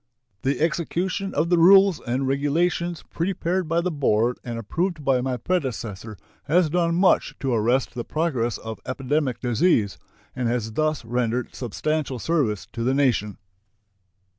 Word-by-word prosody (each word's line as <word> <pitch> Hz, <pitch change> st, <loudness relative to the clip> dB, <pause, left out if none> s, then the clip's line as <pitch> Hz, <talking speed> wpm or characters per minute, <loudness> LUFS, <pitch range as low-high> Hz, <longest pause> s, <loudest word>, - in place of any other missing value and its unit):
The 135 Hz, -1 st, 0 dB
execution 175 Hz, +4 st, -1 dB
of 160 Hz, +3 st, +1 dB
the 175 Hz, -, +4 dB
rules 195 Hz, 0 st, +6 dB
and 130 Hz, +3 st, -2 dB
regulations 165 Hz, +5 st, 0 dB
prepared 180 Hz, 0 st, -1 dB
by 165 Hz, +1 st, +2 dB
the 180 Hz, +1 st, -1 dB
board 125 Hz, -5 st, +1 dB
and 120 Hz, -1 st, -5 dB
approved 165 Hz, -, -2 dB
by 130 Hz, -2 st, +3 dB
my 130 Hz, 0 st, -2 dB
predecessor 115 Hz, -, -3 dB, 0.3 s
has 160 Hz, +1 st, +2 dB
done 170 Hz, -1 st, +1 dB
much 185 Hz, +2 st, +3 dB
to 135 Hz, -3 st, -1 dB
arrest 120 Hz, +3 st, +1 dB
the 120 Hz, -, -4 dB
progress 130 Hz, -8 st, -1 dB
of 110 Hz, -2 st, -7 dB
epidemic 130 Hz, -1 st, -1 dB
disease, 120 Hz, -, +1 dB, 0.4 s
and 125 Hz, -2 st, -1 dB
has 115 Hz, -2 st, -1 dB
thus 155 Hz, +2 st, -1 dB
rendered 120 Hz, +1 st, -1 dB
substantial 140 Hz, +3 st, -2 dB
service 120 Hz, -, 0 dB
to 115 Hz, -, -4 dB
the 130 Hz, +3 st, +1 dB
nation. 120 Hz, -7 st, +1 dB
135 Hz, 145 wpm, -24 LUFS, 120-170 Hz, 0.4 s, rules